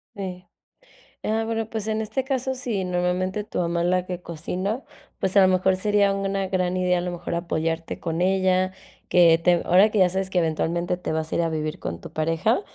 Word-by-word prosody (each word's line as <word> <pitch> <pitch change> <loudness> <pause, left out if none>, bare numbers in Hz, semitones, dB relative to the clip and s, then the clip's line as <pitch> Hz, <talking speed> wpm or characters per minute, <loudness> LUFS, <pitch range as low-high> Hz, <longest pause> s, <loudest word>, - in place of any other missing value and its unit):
Sí, 185 -3 -6 0.8
ah, 220 +1 +1
bueno, 225 -1 -2
pues, 220 -1 -4
en 220 0 0
este 220 +4 -2
caso, 265 -1 -1
si 240 -7 -2
normalmente 180 +2 -1
tu 210 - -6
mamá 170 -1 0
es 175 - +1
la 180 0 +1
que 180 -1 -5
cocina, 185 - -4 0.3
pues, 190 +1 -2
a - - +9
lo 190 - +6
mejor 185 0 +3
sería 205 0 +2
una 195 0 -1
gran 185 -1 0
idea, 180 -1 +2
a - - 0
lo 180 +1 -3
mejor 175 -1 -5
apoyarte 165 -1 -2
con 165 0 -3
ella 185 0 +2 0.4
que 170 -2 +6
te 175 +1 +3
ahora 190 +5 +5
que 210 - 0
ya 185 -2 +6
sabes 190 +1 -2
que 185 - +1
eventualmente 170 +2 0
te 180 - -4
vas 160 0 -2
a - - +1
ir - - +2
a 165 - +1
vivir 155 +1 -3
con 85 0 -5
tu - - -10
pareja, 165 - +1
185 Hz, 215 wpm, -24 LUFS, 170-195 Hz, 0.8 s, a